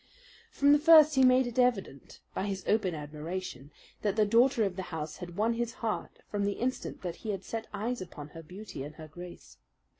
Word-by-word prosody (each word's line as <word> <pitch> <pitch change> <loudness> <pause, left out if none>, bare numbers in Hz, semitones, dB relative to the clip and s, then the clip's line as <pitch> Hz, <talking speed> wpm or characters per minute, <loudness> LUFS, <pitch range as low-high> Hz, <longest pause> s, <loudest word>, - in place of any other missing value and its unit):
From 285 0 +4
the 290 - +6
first 310 -1 +8
he 265 -2 +4
made 255 0 +6
it 240 +1 -3
evident, 220 - 0
by 195 - -2
his 195 -2 -3
open 200 -5 +2
admiration, 150 -1 -6 0.3
that 205 -2 0
the 215 -1 +4
daughter 235 +3 +4
of 195 -3 -1
the 190 - -3
house 155 -2 -5
had 175 -2 -8
won 225 +3 +2
his 235 0 -2
heart 225 -4 -4
from 205 -1 -2
the 200 0 +1
instant 255 0 -3
that 175 -2 -4
he 220 - -7
had 195 -2 -3
set 225 +3 -5
eyes 225 +3 -3
upon 150 -5 -8
her 165 +2 -10
beauty 185 0 -9
and 145 +2 -7
her 155 -1 -10
grace. 175 +3 -11
205 Hz, 210 wpm, -30 LUFS, 175-240 Hz, 0.3 s, first